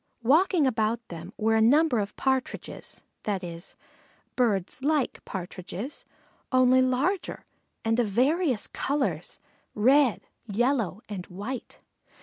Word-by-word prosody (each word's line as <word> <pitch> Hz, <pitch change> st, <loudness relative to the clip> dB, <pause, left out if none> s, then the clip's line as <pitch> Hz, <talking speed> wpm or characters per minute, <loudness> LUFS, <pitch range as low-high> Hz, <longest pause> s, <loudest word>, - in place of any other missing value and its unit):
Walking 320 Hz, -, +4 dB
about 225 Hz, -2 st, +1 dB
them 170 Hz, +2 st, -8 dB
were 220 Hz, +1 st, +2 dB
a 220 Hz, -, +4 dB
number 275 Hz, +2 st, +4 dB
of 205 Hz, 0 st, -3 dB
Partridges, 265 Hz, -1 st, -2 dB, 0.2 s
that 200 Hz, -3 st, -2 dB
is, 170 Hz, +1 st, -7 dB, 0.6 s
birds 225 Hz, -1 st, 0 dB
like 295 Hz, -2 st, 0 dB
Partridges, 190 Hz, +7 st, -6 dB, 0.5 s
only 255 Hz, 0 st, +5 dB
larger 265 Hz, +9 st, 0 dB, 0.4 s
and 225 Hz, +1 st, +2 dB
of 235 Hz, -, +2 dB
various 260 Hz, -, +2 dB
colors, 280 Hz, 0 st, -2 dB, 0.4 s
red, 255 Hz, +3 st, +4 dB, 0.3 s
yellow, 225 Hz, -2 st, 0 dB
and 195 Hz, -4 st, -6 dB
white. 210 Hz, +8 st, -6 dB
240 Hz, 115 wpm, -27 LUFS, 205-270 Hz, 0.6 s, only